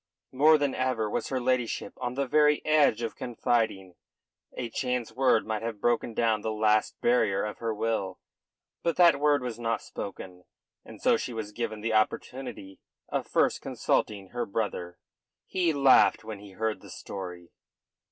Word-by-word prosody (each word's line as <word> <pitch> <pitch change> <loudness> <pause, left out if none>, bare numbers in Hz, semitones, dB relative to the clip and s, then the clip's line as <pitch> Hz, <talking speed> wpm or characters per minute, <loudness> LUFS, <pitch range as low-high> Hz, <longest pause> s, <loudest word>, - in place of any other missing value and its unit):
More 150 +4 +5
than 145 -2 0
ever 130 -4 0
was - - -2
her 130 - -1
ladyship 125 -2 -1
on 125 -1 -4
the 140 +1 0
very 150 +2 +3
edge 145 -7 +3
of 115 - -3
confiding. 110 -6 -1 0.6
A 125 - -2
chance 125 -3 -2
word 125 -2 +2
might 110 -1 -2
have 115 -2 -4
broken 120 0 0
down 110 -2 +2
the 110 - -2
last 110 0 +1
barrier 110 -5 +2
of 105 - -6
her 115 -1 -2
will. 105 -4 -2 0.6
But 170 -1 0
that 170 -5 +6
word 145 -2 +3
was 120 -2 -5
not 115 -1 -1
spoken, 90 -2 -8 0.4
and - - -12
so - - +3
she 125 - -5
was 110 -2 -5
given 110 -1 -4
the 115 +1 -1
opportunity 110 -2 -2 0.3
of - - -2
first - - +1
consulting 100 -3 -1
her 120 +1 -3
brother. 100 -4 -3 0.5
He 180 -3 +1
laughed 140 -3 +5
when 110 -2 -7
he 100 -1 -13
heard 110 +2 -2
the - - -13
story. 90 -3 -8
115 Hz, 165 wpm, -28 LUFS, 105-130 Hz, 0.6 s, that